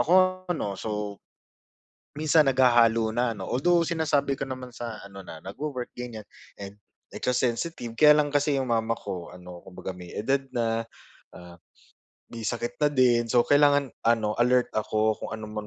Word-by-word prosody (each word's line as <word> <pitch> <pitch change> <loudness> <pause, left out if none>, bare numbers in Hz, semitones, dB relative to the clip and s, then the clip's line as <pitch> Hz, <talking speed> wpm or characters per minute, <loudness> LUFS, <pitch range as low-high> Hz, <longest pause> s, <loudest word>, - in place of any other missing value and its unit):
ako 185 +1 +3
'no, 100 - -4
so, 105 -1 -4 1.0
minsan 155 0 +4
naghahalo 120 -3 +4
na 120 0 +1
'no. 95 - -6
Although, 170 +7 +2
sinasabi 150 -5 0
ko - - -2
naman 130 -1 -6
sa 115 -3 -6
ano, 100 0 -10
na 80 - -9
nagwo-work 125 +5 -5
ganyan, 120 -3 -7 0.4
and, 100 +1 -8 0.4
eh, - - -6
ka - - +1
sensitive. 120 0 -2
Kaya 150 -1 +8
lang 145 -1 +2
kasi 145 0 +2
yung 130 -2 -3
mama 115 0 +1
ko 90 -2 -6
ano, 90 -1 -11
kumbaga 95 +1 -7
may 90 -1 -10
edad 135 +6 0
na, 115 -1 -1 0.5
ah, 90 -1 -12 0.7
may 115 -1 -7
sakit 120 +2 -3
na 150 - +5
din 120 -4 +3
so 120 0 +3
kailangan 145 -1 +4 0.2
ano 110 -2 +2
alert 125 0 +3
ako 110 0 +1
kung - - -6
ano 110 -1 -7
man 105 0 -6
120 Hz, 170 wpm, -26 LUFS, 110-140 Hz, 1.0 s, Kaya